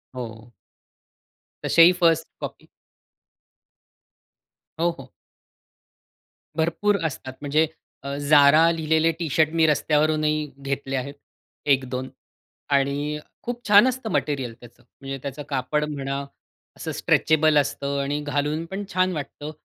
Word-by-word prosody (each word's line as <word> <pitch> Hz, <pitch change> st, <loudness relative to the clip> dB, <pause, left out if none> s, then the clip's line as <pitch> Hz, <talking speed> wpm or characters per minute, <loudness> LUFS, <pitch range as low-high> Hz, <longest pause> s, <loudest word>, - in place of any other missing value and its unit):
हो. 115 Hz, -1 st, -8 dB, 1.1 s
तसेही 170 Hz, +1 st, +7 dB
first 165 Hz, -1 st, +3 dB
copy -, -, -7 dB, 2.1 s
हो, 170 Hz, +1 st, +3 dB
हो. 130 Hz, -1 st, -12 dB, 1.4 s
भरपूर 170 Hz, +6 st, +1 dB
असतात. 130 Hz, -3 st, -4 dB
म्हणजे 150 Hz, +2 st, +2 dB, 0.4 s
अ, -, -, -7 dB, 0.2 s
Zara 150 Hz, +2 st, +7 dB
लिहिलेले 160 Hz, 0 st, +2 dB
टी-शर्ट 160 Hz, -1 st, +2 dB
मी 160 Hz, -, +6 dB
रस्त्यावरूनही 155 Hz, 0 st, +1 dB
घेतले 135 Hz, 0 st, -3 dB
आहेत, 135 Hz, +2 st, -3 dB, 0.5 s
1-2 130 Hz, -2 st, 0 dB, 0.7 s
आणि 145 Hz, +2 st, -1 dB, 0.2 s
खूप 240 Hz, 0 st, -4 dB
छान 205 Hz, +4 st, +7 dB
असतं 255 Hz, -3 st, -3 dB
मटेरिअल 135 Hz, -9 st, -1 dB
त्याचं. 120 Hz, 0 st, -16 dB, 0.2 s
म्हणजे 135 Hz, 0 st, -5 dB
त्याचं 140 Hz, +1 st, -5 dB
कापड 140 Hz, +2 st, -1 dB
म्हणा, 140 Hz, -1 st, -3 dB, 0.5 s
असं -, -, -5 dB
स्ट्रेचेबल 155 Hz, -1 st, +3 dB
असतं. 140 Hz, 0 st, -1 dB
आणि 145 Hz, +2 st, -2 dB
घालून 145 Hz, +2 st, -1 dB
पण 200 Hz, +1 st, -4 dB
छान 185 Hz, 0 st, +2 dB
वाटतं. 145 Hz, 0 st, -6 dB
150 Hz, 110 wpm, -24 LUFS, 140-160 Hz, 2.1 s, तसेही